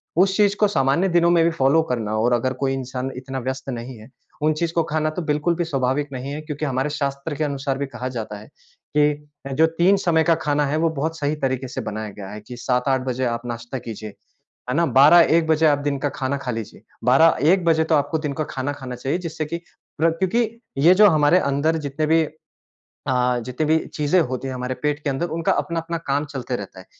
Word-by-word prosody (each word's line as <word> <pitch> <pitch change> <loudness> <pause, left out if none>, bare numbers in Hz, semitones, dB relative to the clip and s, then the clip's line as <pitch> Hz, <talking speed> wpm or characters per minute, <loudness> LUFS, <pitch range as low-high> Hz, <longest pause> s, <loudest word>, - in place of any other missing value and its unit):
उस 190 +3 +3
चीज़ 205 -1 +4
को 210 - +5
सामान्य 140 0 +2
दिनों 170 -1 +3
में 170 -1 +4
भी 165 - +4
फ़ॉलो 160 0 +3
करना 110 -3 -1
और 120 +3 +2
अगर 130 +2 +1
कोई 135 -1 +1
इंसान 130 0 -4
इतना 130 +1 -5
व्यस्त 130 +2 -4
नहीं 120 0 -6
है, 110 +3 -14 0.3
उन 155 +1 +3
चीज़ 165 +2 -2
को 165 - +2
खाना 155 0 -1
तो 155 +3 -4
बिल्कुल 150 +2 0
भी 175 - -1
स्वाभाविक 135 -1 -1
नहीं 130 +2 -5
है 150 - -5
क्योंकि 150 -1 -4
हमारे 135 +1 -1
शास्त्र 140 0 -3
के 155 - -1
अनुसार 140 -2 -2
भी 140 - -2
कहा 125 -1 -6
जाता 105 -2 -5
है 105 - -13 0.5
कि 150 0 +5 0.4
अ, 135 - -5
जो 160 +4 +4
3 190 +4 +5
समय 170 -4 +2
का 165 +1 +3
खाना 145 0 +2
है 145 +2 -1
वो 165 +1 +2
बहुत 160 +3 -2
सही 145 +1 0
तरीके 130 -3 -2
से 125 - -5
बनाया 110 0 -5
गया 100 -2 -7
है 105 +1 -8
कि 125 - -8
7-8 130 +1 0
बजे 130 0 -1
आप 115 0 -2
नाश्ता 120 +2 -5
कीजिए, 110 -2 -7 0.6
है 125 - 0
ना? 170 +1 +3
12-1 160 +3 +6
बजे 160 0 +3
आप 145 -1 +4
दिन 140 - 0
का - - +2
खाना 135 +1 -1
खा 130 -2 -4
लीजिए, 115 -4 -6 0.2
12-1 160 +7 +4
बजे 160 -1 +3
तो 160 0 +2
आपको 145 +2 +1
दिन 140 - -3
का 155 - -2
खाना 130 +2 -2
खाना 130 -3 -7
चाहिए 135 +6 -2
जिससे 160 -1 -4
कि 170 +3 -4 0.4
प्र 165 +1 +4
क्योंकि 220 +5 +1 0.3
ये 160 +6 +6
जो 210 +2 +7
हमारे 155 +1 +4
अंदर 145 +2 +1
जितने 150 +3 -2
भी 160 +1 +4 0.9
अ, 125 -1 +2
जितनी 130 +5 -2
भी 160 +1 +4 0.2
चीज़ें 150 +4 +2
होती 130 -3 -2
हैं 130 - -4
हमारे 125 0 -3
पेट 150 0 0
के 145 - +1
अंदर 135 +6 -1
उनका 165 - +1
अपना-अपना 170 0 -2
काम 140 +2 0
चलते 130 -3 -4
रहता 100 -3 -9
है। 95 - -15
145 Hz, 230 wpm, -22 LUFS, 130-160 Hz, 0.9 s, जो